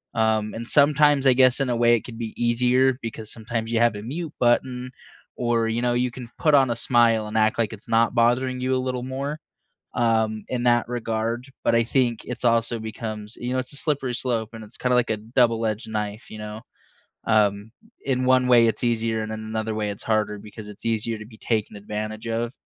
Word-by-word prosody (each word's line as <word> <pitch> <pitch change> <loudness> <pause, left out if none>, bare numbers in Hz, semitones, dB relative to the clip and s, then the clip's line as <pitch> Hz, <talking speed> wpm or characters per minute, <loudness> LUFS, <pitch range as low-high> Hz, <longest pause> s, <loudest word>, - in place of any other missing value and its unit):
um, 110 -1 +1
and 115 +1 -6
sometimes, 145 -1 +4
I 130 - +7
guess, 130 +1 +4
in 135 -2 0
a 120 - +1
way, 120 0 +4
it 115 - -2
could 115 -2 -9
be 115 -2 -5
easier 125 +2 +2
because 110 -1 -5
sometimes 115 0 -4
you 115 - +1
have 120 -2 +3
a 105 - -6
mute 155 +6 -5
button 125 +1 +1 0.5
or, 120 -2 +1
you 115 +2 -1
know, 120 0 +1
you 125 0 0
can 125 -1 -9
put 155 -2 +3
on 135 -3 +4
a 120 - 0
smile 115 -2 +3
and 110 +1 -3
act 110 +1 +3
like 115 -3 0
it's 105 - -11
not 115 0 +3
bothering 125 +2 +2
you 130 0 +1
a - - +2
little 125 -1 -2
more, 140 +4 -4 0.6
um, 110 -2 +1
in 125 -1 -2
that 120 -1 +3
regard. 115 +1 -2 0.2
But - - +3
I 115 - +4
think 120 -2 0
it's 125 0 -6
also 115 0 +2
becomes, 110 -1 -6
you 125 +1 -4
know, - - 0
it's 130 - -6
a - - -4
slippery 140 -5 -1
slope, 115 -3 -1
and 110 -1 -8
it's 105 - -10
kinda 125 0 +1
like 125 -2 +2
a 110 - +1
double 115 0 +1
edged 110 +1 -3
knife. 105 0 -4
You 110 - -8
know? 105 +1 -7 0.7
Um, 105 0 +2 0.3
in 130 -1 0
one 130 0 +4
way, 120 -2 +6
it's 115 - -1
easier, 115 -1 0
and 110 - -5
in 110 - -5
another 110 0 -3
way, 105 -1 -2
it's 100 - -7
harder 105 -2 0
because 105 +1 -10
it's 105 +1 -11
easier 115 0 0
to 105 - -9
be 110 -1 -16
taken 110 -2 -1
advantage 110 +2 -5
of 115 +1 -2
115 Hz, 220 wpm, -24 LUFS, 110-125 Hz, 0.7 s, I